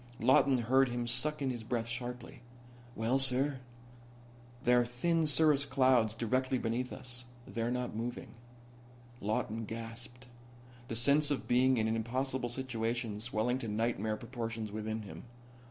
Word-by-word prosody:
Lawton 130 0 +4
heard 130 +3 +3
him 120 0 -2
suck 140 +5 +1
in 130 - 0
his 120 -2 -6
breath 115 0 -2
sharply. 120 +1 -6 0.5
"Well, 115 +4 +1
sir?" 135 +1 +4 1.0
"There 125 0 +5
are - - +2
thin 155 +7 0
cirrus 150 -1 +4
clouds 130 -5 +3
directly 130 +3 0
beneath 120 +2 -2
us. 125 -1 -5 0.2
They're 115 0 -2
not 125 -2 -2
moving." 120 +2 -4 0.9
Lawton 110 +2 -2
gasped, 115 +3 -8 0.6
the 115 - -4
sense 140 +5 +4
of 145 - -2
being 130 +1 +4
in 110 -1 +1
an 110 - 0
impossible 125 +2 -2
situation 115 -3 -3
swelling 120 +2 0
to 120 - -5
nightmare 110 0 -1
proportions 115 -3 -5
within 110 +1 -4
him. 100 - -9
120 Hz, 140 wpm, -33 LUFS, 115-130 Hz, 1.0 s, There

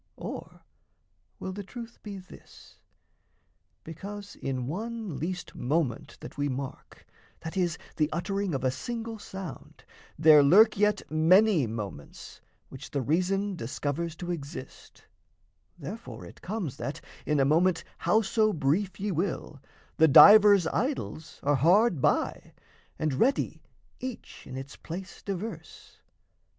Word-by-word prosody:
Or - - -8 0.8
will 190 - -5
the 205 - -5
truth 235 +3 -10
be 205 -2 -7
this: 185 -1 -15 1.0
Because 200 +5 -8
in 130 -2 -3
one 215 - -4
least 180 +3 -4
moment 145 0 -2
that - - -10
we 145 0 0
mark 130 0 -7 0.4
That 160 - -6
is, 175 -3 0 0.2
the 150 -1 +2
uttering 195 0 -2
of 135 - -3
a 130 - +2
single 230 - -5
sound 160 -7 -9 0.3
There 155 -1 +8
lurk 205 +10 +6
yet 210 +1 +2
many 165 - +4
moments, 105 -9 -8 0.3
which - - -10
the 140 - -2
reason 190 - 0
Discovers 155 +5 -3
to 175 +1 -5
exist, 145 -4 -8 0.7
therefore 185 +9 -8
it - - -14
comes 180 - -4
That, 145 -1 -4 0.3
in 150 -1 +2
a 135 - +4
moment 165 +4 +3 0.2
how 220 +1 +3
so 215 +1 +2
brief 170 +6 0
ye 205 +1 -1
will, 165 -5 -3 0.4
The 160 - +6
divers 205 +4 +9
idols 220 - -3
are 145 0 +3
hard 175 - +4
by, - - 0 0.4
and 155 -2 -1
ready 250 - +1 0.4
Each 255 -2 -8
in 130 - -7
its 135 +2 -8
place 180 +2 -8
diverse? 200 +3 -7
175 Hz, 130 wpm, -28 LUFS, 145-205 Hz, 1.0 s, divers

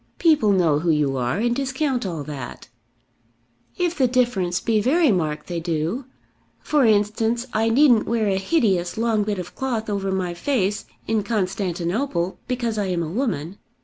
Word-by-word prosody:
"People 300 -11 +4
know 170 -6 +3
who 170 +2 -1
you 150 -4 +2
are, 125 +4 -1
and 240 +3 +1
discount 265 -3 -1
all 165 -5 -4
that." 140 -5 -8 1.1
"If 355 -1 0
the 265 -4 +3
difference 235 -8 +1
be 220 -2 +1
very 300 +4 +3
marked 155 -5 -1
they 175 -2 -3
do. 165 - -2 0.5
For 295 -4 +2
instance, 220 +3 +2
I 225 +1 +2
needn't 245 -2 +4
wear 230 -2 +1
a 195 -1 +1
hideous 195 - +1
long 225 -1 +1
bit 205 -1 -2
of 180 -1 -6
cloth 235 -5 -2
over 195 -1 -1
my 185 -2 -1
face 205 -1 -1 0.2
in 220 -1 +1
Constantinople 190 -1 -2
because 235 -4 -1
I 205 - 0
am 175 -2 -1
a 155 - -4
woman. 190 - -2
210 Hz, 165 wpm, -23 LUFS, 175-240 Hz, 1.1 s, People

